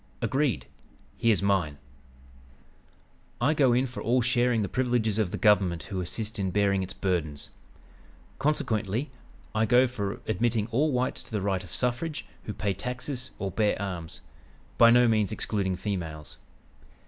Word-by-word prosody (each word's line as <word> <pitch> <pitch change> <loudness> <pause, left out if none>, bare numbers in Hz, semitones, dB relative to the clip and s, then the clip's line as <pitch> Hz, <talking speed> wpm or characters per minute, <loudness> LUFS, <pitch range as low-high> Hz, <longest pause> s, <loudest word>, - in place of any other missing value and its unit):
"Agreed. 135 - 0 0.5
Here's 110 -4 +2
mine: 95 -8 +1 1.6
"I 140 +6 +3
go 140 -5 +4
in 125 +2 +3
for 120 -5 -6
all 120 +3 +2
sharing 120 -2 +2
the - - -1
privileges 120 -3 0
of 105 -5 +1
the - - -4
government 95 -6 +3
who 95 -2 -4
assist 105 +5 -2
in 95 -1 0
bearing 100 0 +2
its 95 - -5
burdens. 80 -7 -2 0.9
Consequently, 120 -3 0 0.4
I 110 +1 +2
go 125 +2 +6
for 100 -6 -3
admitting 110 +1 +1
all 145 +6 +2
whites 125 0 0
to - - -14
the 105 - -1
right 95 -1 -1
of 85 - -13
suffrage 130 +6 -2 0.2
who 105 - -4
pay 100 -2 -1
taxes 125 - -5
or 100 -1 -3
bear 105 +2 +1
arms 90 -5 -5 0.6
(by 115 - +9
no 120 +1 +6
means 110 -3 +2
excluding 100 -3 -1
females). 85 -7 -5
110 Hz, 150 wpm, -27 LUFS, 95-125 Hz, 1.6 s, by